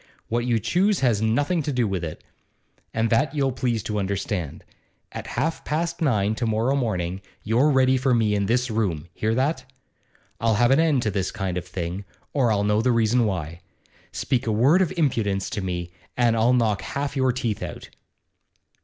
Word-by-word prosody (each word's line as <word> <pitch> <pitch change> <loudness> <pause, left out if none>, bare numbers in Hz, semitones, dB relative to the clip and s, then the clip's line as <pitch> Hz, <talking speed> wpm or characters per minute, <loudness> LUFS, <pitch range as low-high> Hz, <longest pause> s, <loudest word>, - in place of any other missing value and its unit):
What 120 +1 0
you 120 -2 +2
choose 185 - +1
has 115 -6 +2
nothing 145 +10 +1
to 150 - -2
do 125 -4 +1
with 95 -3 -2
it, 80 -2 -6 0.7
and 115 0 0
that 135 +6 +2
you'll 135 -2 +1
please 120 -4 -1
to 105 -1 -2
understand. 100 -4 -3 0.5
At - - -7
half 160 +6 -1
past 170 +3 -2
nine 110 -8 +2
to 120 - -1
morrow 110 +5 +1
morning 95 -8 -2 0.2
you're 120 +8 +3
ready 130 -2 +4
for 130 +1 +1
me 110 -3 +2
in 100 -1 0
this 125 +2 +1
room; 90 -8 -1
hear 110 +1 -1
that? 130 +2 0 0.8
I'll 115 -1 +2
have 120 +4 +3
an 135 - +5
end 155 -6 +3
to 105 - 0
this 95 -2 -1
kind 95 -2 -3
of 90 0 -4
thing, 90 +1 -4 0.3
or 130 -5 +2
I'll 100 -1 +1
know 105 +1 +2
the 125 +2 +2
reason 115 0 +2
why. 85 -4 -4 0.5
Speak 125 -3 -1
a - - +2
word 135 - +4
of 185 - +1
impudence 110 - 0
to 105 - -3
me 90 -2 -4 0.3
and 120 -2 +3
I'll 115 +2 +3
knock 110 -4 +2
half 140 0 -4
your 130 -1 +2
teeth 120 -4 -2
out! - - -7
115 Hz, 190 wpm, -24 LUFS, 100-130 Hz, 0.8 s, an